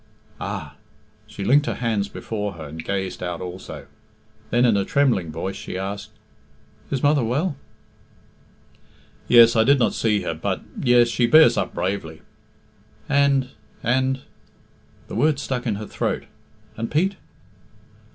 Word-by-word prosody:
"Ah!" -, -, -5 dB, 0.5 s
She -, -, -7 dB
linked 145 Hz, +3 st, +4 dB
her -, -, -1 dB
hands 110 Hz, -4 st, -1 dB
before 105 Hz, -2 st, -4 dB
her, 80 Hz, -3 st, -9 dB
and 80 Hz, +2 st, -8 dB
gazed 95 Hz, -2 st, -3 dB
out 90 Hz, -2 st, -3 dB
also. 90 Hz, 0 st, -8 dB, 0.6 s
Then, 120 Hz, +2 st, +3 dB
in 115 Hz, -4 st, +4 dB
a 100 Hz, -, +2 dB
trembling 115 Hz, -, +1 dB
voice, 95 Hz, +5 st, -4 dB
she -, -, -6 dB
asked, 100 Hz, +2 st, -5 dB, 0.8 s
"Is 135 Hz, -2 st, -2 dB
mother 145 Hz, -2 st, +4 dB
well?" 140 Hz, +8 st, 0 dB, 1.7 s
"Yes; 115 Hz, -1 st, +7 dB
I 110 Hz, -, +5 dB
did 140 Hz, +4 st, +5 dB
not 120 Hz, -, +2 dB
see 105 Hz, -3 st, +1 dB
her, 80 Hz, -, -2 dB
but 80 Hz, -, -3 dB, 0.2 s
yes, 120 Hz, -2 st, +5 dB
she 120 Hz, 0 st, +2 dB
bears 155 Hz, -3 st, +7 dB
up -, -, -2 dB
bravely." 85 Hz, -3 st, -3 dB, 0.8 s
"And 140 Hz, -2 st, +2 dB, 0.3 s
and 130 Hz, +2 st, +1 dB, 0.4 s
" -, -, -32 dB
the -, -, -9 dB
words 150 Hz, -2 st, +2 dB
stuck 125 Hz, -2 st, -3 dB
in 110 Hz, -, 0 dB
her 105 Hz, +1 st, -6 dB
throat, -, -, -2 dB, 0.5 s
"and 115 Hz, +1 st, -3 dB
Pete?" 185 Hz, +6 st, +1 dB
115 Hz, 145 wpm, -23 LUFS, 95-135 Hz, 1.7 s, Yes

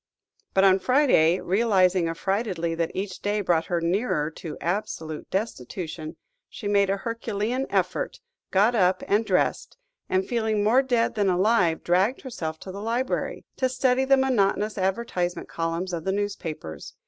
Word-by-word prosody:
But 195 Hz, -, +5 dB
on 190 Hz, 0 st, +5 dB
Friday, 190 Hz, -, +4 dB
realising 185 Hz, -3 st, +2 dB
affrightedly 180 Hz, -1 st, -1 dB
that 165 Hz, 0 st, -1 dB
each 190 Hz, -1 st, -4 dB
day 205 Hz, +1 st, 0 dB
brought 170 Hz, -4 st, +1 dB
her 175 Hz, -2 st, 0 dB
nearer 170 Hz, -3 st, 0 dB
to 160 Hz, -1 st, -8 dB
absolute 165 Hz, -4 st, -3 dB
destitution, 165 Hz, -, -4 dB, 0.3 s
she 210 Hz, -, -6 dB
made 200 Hz, -1 st, +3 dB
a 195 Hz, -, +1 dB
herculean 230 Hz, +3 st, -2 dB
effort, -, -, -1 dB, 0.3 s
got 205 Hz, +5 st, +3 dB
up 185 Hz, -4 st, +2 dB
and 210 Hz, +3 st, +3 dB
dressed, -, -, 0 dB, 0.3 s
and, 185 Hz, 0 st, +1 dB
feeling 220 Hz, -3 st, 0 dB
more 235 Hz, +5 st, +5 dB
dead 245 Hz, -4 st, +1 dB
than 205 Hz, -3 st, +1 dB
alive, 185 Hz, -2 st, +2 dB
dragged 190 Hz, +9 st, +2 dB
herself 160 Hz, -, -5 dB
to 190 Hz, -, -7 dB
the 200 Hz, +2 st, -7 dB
library, 235 Hz, +4 st, -2 dB
to 260 Hz, -1 st, +1 dB
study 255 Hz, 0 st, +2 dB
the 270 Hz, 0 st, +4 dB
monotonous 215 Hz, -5 st, +1 dB
advertisement 190 Hz, -2 st, -2 dB
columns 165 Hz, +2 st, -3 dB
of 165 Hz, -2 st, -3 dB
the 190 Hz, -, 0 dB
newspapers. 165 Hz, -, -4 dB
195 Hz, 150 wpm, -25 LUFS, 175-230 Hz, 0.3 s, But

